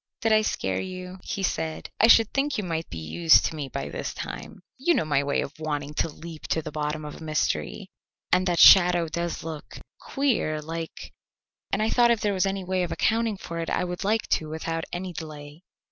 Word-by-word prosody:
"Did 225 - +2
I 215 - +5
scare 95 - -1
you?" 185 0 -7
he 195 - -4
said. 160 -3 -2
"I 225 - +6
should 225 -1 +6
think 275 0 0
you 210 - -1
might 165 -2 -3
be 85 - -7
used 160 - +4
to 160 - -2
me 145 -3 -5
by 75 - -4
this - - -5
time. 75 - -7 0.2
You 340 +5 +3
know - - +1
my 145 -2 +2
way 140 0 0
of 140 - -5
wanting 150 -2 -3
to 165 - 0
leap 160 +1 -10
to 160 - 0
the - - -6
bottom 150 0 -3
of 150 - -7
a - - -11
mystery, 150 - -2 0.4
and 185 +1 +3
that 175 -1 +1
shadow 175 -2 +7
does 170 +1 -3
look 155 -2 -7 0.2
queer, 245 - 0
like 165 +1 -7 0.6
and - - +1
I 220 - +1
thought 240 -1 +5
if 235 -2 +3
there 205 -1 +1
was 190 0 +1
any 195 0 -2
way 185 0 -1
of 175 -2 -2
accounting 225 -2 +1
for 170 -3 -6
it 165 - -3
I - - 0
would 180 0 -4
like 215 +3 +1
to 155 - 0
without 165 +1 -3
any 180 +1 -4
delay." 150 -1 -9
165 Hz, 220 wpm, -26 LUFS, 155-190 Hz, 0.6 s, shadow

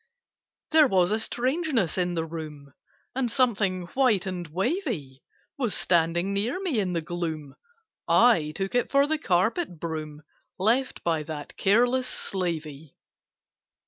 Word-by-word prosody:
There 310 -2 +6
was 185 -4 +3
a 215 - +2
strangeness 255 - 0
in 180 -1 0
the 165 -1 -1
room, 155 -4 -8 0.4
And 255 -2 0
Something 210 -8 +1
white 250 -8 +3
and 180 -3 -4
wavy 185 - -2 0.4
Was 240 -6 0
standing 175 +2 +1
near 220 - -1
me 345 - 0
in 185 -3 -1
the 170 - 0
gloom— 160 -4 -4 0.5
I 190 -12 +4
took 195 0 -3
it 245 - +1
for 280 0 +4
the 310 +1 -1
carpet 190 - 0
broom 155 -2 -5 0.3
Left 235 +7 +1
by 165 -2 +1
that 150 -1 -7
careless 245 +5 +3
slavey. 160 -6 -4
185 Hz, 135 wpm, -26 LUFS, 160-245 Hz, 0.5 s, There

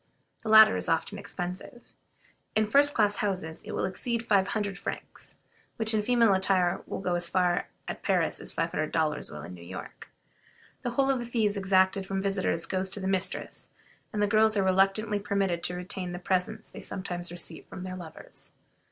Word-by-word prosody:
The 220 - -5
latter 220 - +9
is 90 - -2
often - - 0
expensive. 180 +7 -6 0.7
In 215 - +3
first 285 +6 +4
class 205 -2 +3
houses 180 -6 -2
it - - -7
will - - 0
exceed 230 +4 -2
five 200 -4 +3
hundred 200 -2 -2
francs, - - -6 0.4
which 220 0 +2
in 215 - +2
female 230 -1 +4
attire 190 -2 +2
will - - -4
go 180 -2 -1
as 175 -1 +3
far 180 -1 +1 0.2
at - - -5
Paris - - +1
as - - -7
five - - -1
hundred 155 0 -2
dollars 155 -2 0
will 75 -1 -8
in 90 - -8
New 90 - -11
York. 85 - -9 0.7
The 245 - -2
whole 275 0 +4
of 265 - 0
the 240 - -4
fees 220 -4 +1
exacted 190 0 +2
from 195 0 -2
visitors 190 -4 0
goes 190 0 -1
to 195 - -3
the 190 - -3
mistress, 190 -1 -1 0.4
and 210 -1 0
the - - +3
girls 215 +1 +4
are 195 - +3
reluctantly 195 +3 +2
permitted 195 -4 0
to 180 - -1
retain 180 0 -4
the - - -4
presents 190 +4 -1
they - - -10
sometimes 175 -2 -5
receive 175 -2 -4
from 185 - -8
their 185 0 -5
lovers. 170 -4 -7
195 Hz, 195 wpm, -28 LUFS, 180-215 Hz, 0.7 s, latter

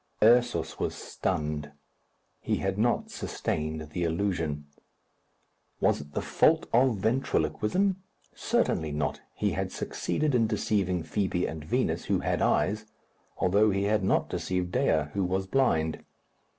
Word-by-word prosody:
Ursus 115 -8 +3
was - - -1
stunned. 75 -1 -3 0.7
He - - -1
had 95 +1 -2
not 120 +2 +1
sustained 80 0 -3
the 85 - -2
illusion. 80 -4 -1 1.1
Was - - +2
it 75 0 -13
the - - -2
fault - - +3
of 125 -1 +4
ventriloquism? 135 - 0 0.3
Certainly 80 -2 0
not. 75 -2 -2
He - - 0
had - - -2
succeeded 150 -2 -1
in 115 -3 +3
deceiving 100 -5 0
Fibi 95 -1 -1
and 80 -2 -5
Vinos, 75 - 0
who - - +1
had - - 0
eyes, 105 +2 +1 0.5
although 100 +4 +3
he 100 0 0
had 105 -1 +1
not 95 - +2
deceived 90 -1 -2
Dea, 80 -3 +2
who 100 - 0
was 95 +1 0
blind. 90 -10 +1
95 Hz, 135 wpm, -28 LUFS, 80-110 Hz, 1.1 s, of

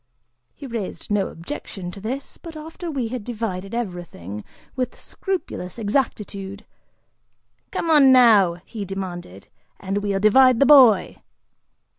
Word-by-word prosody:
He 285 - -10
raised 230 -5 -6
no 205 -2 +1
objection 180 - -7
to 195 - -11
this, 260 +6 -6
but 325 -2 -10
after 325 +3 -7
we 260 -7 -2
had 250 -2 -5
divided 215 -3 -4
everything 175 - -6 0.3
with 255 -2 -3
scrupulous 355 - -5
exactitude, 205 -4 -2 1.0
"Come 330 - -2
on 280 -4 +7
now," 220 -9 +6
he 220 -4 -6
demanded, 180 - -7 0.3
"and 195 +1 -2
we'll 200 -1 -1
divide 250 +4 +5
the 280 - +5
boy!" 255 -8 +6
215 Hz, 125 wpm, -22 LUFS, 195-260 Hz, 1.0 s, on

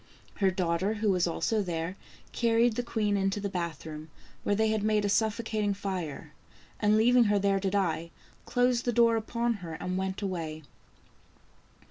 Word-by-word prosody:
Her 195 -2 +3
daughter, 185 +2 0
who 215 -1 +1
was 180 -2 +2
also 215 +5 0
there, 170 -1 -3 0.4
carried 230 0 +2
the 245 - 0
queen 215 -4 0
into 195 +1 0
the 200 0 -3
bath 170 -5 -4
room, 155 0 -8 0.3
where 205 - +1
they 220 +1 +2
had 215 -1 0
made 210 0 +2
a - - +1
suffocating 215 -1 0
fire, 175 -6 -5 0.5
and 210 0 +3
leaving 240 +2 +5
her 205 -1 +3
there 200 0 +2
to 195 0 0
die, 170 -4 0 0.4
closed 245 -1 +2
the 240 - +1
door 230 0 +5
upon 235 +2 -1
her 165 -2 -6
and 185 +2 -3
went 190 +1 -3
away. 160 -5 -4
200 Hz, 170 wpm, -29 LUFS, 180-220 Hz, 0.5 s, leaving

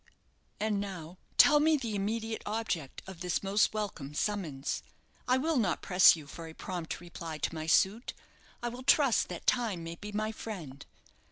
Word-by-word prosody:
"And 210 -1 0
now 185 -3 -6 0.2
tell 295 0 +8
me 310 +1 +4
the 235 -6 -4
immediate 220 +3 -2
object 205 - -3
of 190 -3 -10
this 180 +1 -1
most 200 +2 +3
welcome 195 -10 -4
summons. 160 -9 -2 0.5
I 255 +1 +4
will 310 +3 +1
not 200 -8 0
press 180 -1 +7
you 155 -3 -10
for 165 +4 -9
a 160 - -10
prompt 175 -4 -5
reply 170 -2 -7
to 150 - -2
my 160 -1 -5
suit; 200 +8 +2 0.5
I 240 - 0
will 245 +2 -8
trust 265 -2 +4
that 175 -2 -7
time 220 -9 +1
may 165 0 -5
be 210 +2 -7
my 215 +1 -1
friend. 170 -12 -7
195 Hz, 175 wpm, -31 LUFS, 165-225 Hz, 0.5 s, tell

